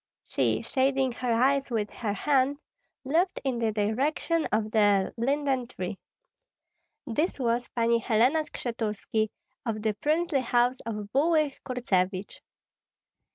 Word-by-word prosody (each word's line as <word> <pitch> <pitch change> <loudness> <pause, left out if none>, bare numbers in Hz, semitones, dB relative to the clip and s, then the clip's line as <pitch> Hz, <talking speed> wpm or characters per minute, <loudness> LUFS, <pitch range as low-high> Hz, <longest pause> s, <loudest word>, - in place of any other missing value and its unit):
She, - - 0
shading 265 -1 +1
her 245 0 -2
eyes 270 +4 +2
with 215 -4 -1
her 215 -4 -3
hand, 275 +4 +2 0.5
looked 335 +7 +1
in 260 -4 -1
the 225 -2 +1
direction 270 +10 0
of 215 0 0
the 205 -3 +3
linden 265 0 0
tree. 185 -4 -5 1.1
This 295 +7 -1
was 240 -1 0
Pani 235 0 +3
Helena 240 +7 +3
Skshetuski, 225 -6 -2 0.3
of 215 -3 -3
the 215 -1 +1
princely 305 +5 +1
house 245 +1 +2
of 210 -2 -5
Bulyga 305 0 +2
Kurtsevich. 195 -6 -1
245 Hz, 120 wpm, -28 LUFS, 215-275 Hz, 1.1 s, the